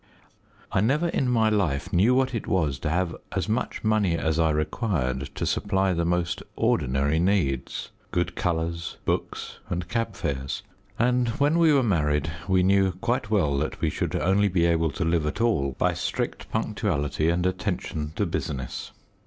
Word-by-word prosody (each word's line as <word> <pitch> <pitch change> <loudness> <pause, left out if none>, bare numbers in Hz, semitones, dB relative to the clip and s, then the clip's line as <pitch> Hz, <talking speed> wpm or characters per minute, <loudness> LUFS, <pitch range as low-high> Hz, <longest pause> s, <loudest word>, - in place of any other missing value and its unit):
I - - +2
never 150 +10 +2
in 130 -5 0
my 115 -3 +3
life 95 -4 0
knew 105 +8 +4
what 130 0 +2
it 115 - -3
was 80 - +1
to 75 - -2
have 85 +1 0 0.2
as - - -1
much 110 +3 -2
money 105 -6 +2
as 80 0 0
I 80 -1 +4
required 75 - -1
to - - -2
supply 95 -2 +1
the 85 -1 0
most 85 0 0
ordinary 70 +4 +1
needs 85 -8 0 0.2
good 90 0 -1
colours, 85 -1 -2
books, - - -3
and 90 0 -2
cab 115 +4 -2
fares 65 -1 -3 0.3
and 125 +1 +2
when 150 +4 +3
we 165 -2 +6
were 140 -3 +4
married 75 - +1 0.2
we 95 -1 +3
knew 95 0 +3
quite 105 +4 -1
well 90 -10 +2
that 75 - -3
we - - 0
should - - -2
only 100 +3 +3
be 90 -3 +2
able 85 -1 +2
to 85 - -2
live 80 -2 +1
at 75 - -3
all 70 - +1
by - - +2
"strict - - -3
punctuality 75 +2 0
and 85 +1 +1
attention 80 -4 -2
to 105 - +1
business." 70 -7 -4
90 Hz, 170 wpm, -26 LUFS, 80-105 Hz, 0.3 s, we